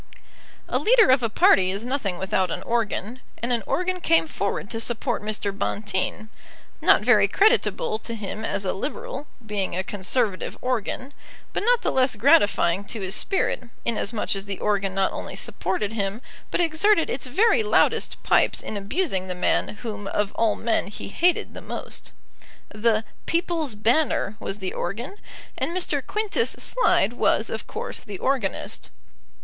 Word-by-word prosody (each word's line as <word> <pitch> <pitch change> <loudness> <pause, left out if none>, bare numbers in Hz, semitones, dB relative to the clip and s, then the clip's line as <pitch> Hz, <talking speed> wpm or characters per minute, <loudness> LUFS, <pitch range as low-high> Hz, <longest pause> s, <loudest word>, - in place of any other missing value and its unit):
A - - 0
leader 455 - +5
of 260 0 +5
a 230 - 0
party 190 -3 +5
is 200 +4 -2
nothing 245 -9 -2
without 190 -1 0
an 180 +2 -4
organ, 230 +1 -2 0.2
and 240 +2 -1
an 235 - +1
organ 365 0 0
came 330 -1 +4
forward 200 -8 -2
to 225 -1 -2
support 240 +2 -1
Mr. 210 -1 -3
Bonteen, 210 +1 -2 0.5
not - - +5
very - - +5
creditable 440 +2 +2
to 230 - -5
him 215 0 -5
as 200 -2 -2
a 185 - 0
Liberal, 390 - -5 0.2
being 205 -4 -2
a 185 - -1
Conservative 205 +1 -1
organ, 255 +2 -2 0.4
but - - -1
not 485 +2 +3
the - - +1
less 260 -2 +3
gratifying 200 -3 +4
to 215 0 -6
his 190 0 -3
spirit, 380 -9 0 0.2
inasmuch 225 -2 -1
as 195 0 -5
the 200 -2 -4
organ 200 -2 0
not 195 -1 +2
only - - -5
supported 200 +3 -2
him, 200 0 -2 0.3
but - - -1
exerted 335 +2 +3
its 255 0 -2
very 435 - +4
loudest 430 - +2
pipes - - +3
in 215 - -4
abusing 200 - -1
the 180 - -3
man 180 - +1 0.2
whom 205 -3 -5
of 205 0 -1
all 225 -2 +2
men 230 -3 0
he 200 - -7
hated 345 - +1
the - - -8
most. - - -7 0.6
The 220 +1 +1 0.2
People's 330 -7 0
Banner 230 0 +1
was 195 - -3
the 190 -3 -4
organ, 235 - -4 0.4
and 340 - -1
Mr. 300 -6 0
Quintus 430 - -1
Slide 240 - +2
was, 230 -2 +1
of 220 - -5
course, - - -5
the 200 -2 -7
organist. 260 -6 -2
225 Hz, 165 wpm, -24 LUFS, 200-300 Hz, 0.6 s, leader